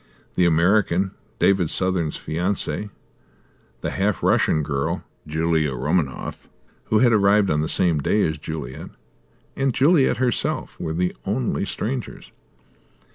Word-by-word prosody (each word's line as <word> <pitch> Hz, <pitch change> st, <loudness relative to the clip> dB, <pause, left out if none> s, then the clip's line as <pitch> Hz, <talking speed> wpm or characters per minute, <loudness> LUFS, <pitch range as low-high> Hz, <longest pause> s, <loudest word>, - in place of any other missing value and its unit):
The 90 Hz, -, +2 dB
American, 90 Hz, +2 st, +2 dB, 0.3 s
David 95 Hz, -5 st, +2 dB
Southern's 90 Hz, -4 st, -1 dB
fiancée, 95 Hz, +5 st, -1 dB, 0.9 s
the -, -, -2 dB
half 100 Hz, +1 st, -1 dB
Russian 75 Hz, -, +2 dB
girl, 70 Hz, -1 st, -2 dB, 0.2 s
Julia 80 Hz, -2 st, 0 dB
Romaninov, 70 Hz, 0 st, -2 dB, 0.4 s
who 110 Hz, -, +2 dB
had 120 Hz, +1 st, +4 dB
arrived 100 Hz, -1 st, +4 dB
on 75 Hz, 0 st, +1 dB
the 75 Hz, -, -2 dB
same 85 Hz, -4 st, +3 dB
day 105 Hz, +9 st, +1 dB
as 80 Hz, -1 st, -1 dB
Juliet, 75 Hz, -5 st, -6 dB, 0.7 s
and 135 Hz, -3 st, 0 dB
Juliet 145 Hz, 0 st, +4 dB
herself, 125 Hz, -2 st, -1 dB
were 80 Hz, -, -3 dB
the 90 Hz, +2 st, -1 dB
only 110 Hz, 0 st, -1 dB
strangers. 120 Hz, +5 st, -5 dB
90 Hz, 125 wpm, -22 LUFS, 80-105 Hz, 0.9 s, had